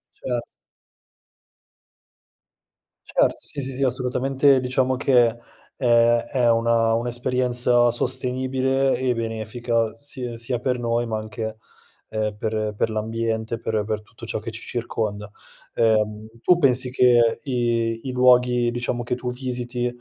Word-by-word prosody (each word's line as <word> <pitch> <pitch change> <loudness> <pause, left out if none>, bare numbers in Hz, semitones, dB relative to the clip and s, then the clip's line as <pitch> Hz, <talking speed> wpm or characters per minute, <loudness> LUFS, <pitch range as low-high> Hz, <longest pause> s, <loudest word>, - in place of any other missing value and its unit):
Cert 120 -2 -5 2.5
Certo, - - +2
sì, 145 -2 -4
sì, 135 +1 -3
sì, 135 +2 0
assolutamente, 130 +2 +2
diciamo 130 0 0
che 125 -3 +4 0.5
è 120 -1 +3
è 125 -3 +3
una 115 0 +2
un'esperienza 120 0 +1
sostenibile 130 +2 0
e 130 -1 0
benefica 115 0 -2
si 130 -2 -6
sia 120 +2 -2
per 125 +1 -1
noi 120 0 0
ma 110 -1 -2
anche, 110 0 -5 0.5
uhm, 105 -1 -2
per 110 0 -2
per 115 - 0
l'ambiente, 110 +1 -2
per 110 -2 -1
per 105 0 -3
tutto 115 +2 -13
ciò 110 - -3
che 115 - -6
ci 115 0 -8
circonda. 105 -3 -4 0.5
Uhm, 110 -1 +1 0.2
tu 180 -1 +4
pensi 130 -4 +3
che 120 -3 +4
i 115 -3 0
i 130 - -5
luoghi, 125 -1 +4
diciamo, 120 0 -2
che 120 - -1
tu 125 0 -4
visiti, 125 -1 -3
120 Hz, 130 wpm, -23 LUFS, 115-125 Hz, 2.5 s, che